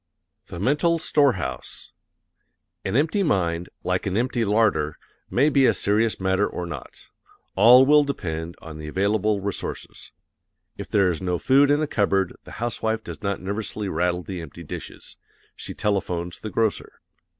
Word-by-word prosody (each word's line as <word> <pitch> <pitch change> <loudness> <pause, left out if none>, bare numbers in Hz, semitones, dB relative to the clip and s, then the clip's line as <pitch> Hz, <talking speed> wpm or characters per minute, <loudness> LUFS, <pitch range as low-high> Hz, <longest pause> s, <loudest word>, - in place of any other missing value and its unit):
The 85 - -8
Mental 150 - +2
Storehouse 140 - -1 0.9
An 95 - -2
empty 160 +9 +2
mind, 90 - 0
like 90 +2 -1
an 95 +1 -1
empty 120 0 0
larder, 105 -8 +1 0.3
may 140 +4 +3
be 140 -3 +4
a - - +3
serious 110 +2 +1
matter 95 +2 +1
or 90 - -5
not 75 -7 -9 0.5
all 125 +3 +8
will 150 +1 +6
depend 85 - -4
on 80 -1 -9
the 75 - -7
available 100 +4 +1
resources. 100 0 -5 0.6
If - - -8
there 100 -3 +3
is 85 - -5
no 90 -1 -1
food 140 +8 +4
in 145 +1 +3
the - - +2
cupboard 100 -6 +1
the - - -11
housewife 110 -1 -2
does - - -8
not 100 -2 -2
nervously 100 +2 -3
rattle 90 +1 0
the 95 -3 -6
empty 80 +2 -10
dishes; 75 - -9 0.4
she - - -8
telephones 90 -4 -2
the 110 - -6
grocer. 110 +1 -1
100 Hz, 155 wpm, -24 LUFS, 90-120 Hz, 0.9 s, all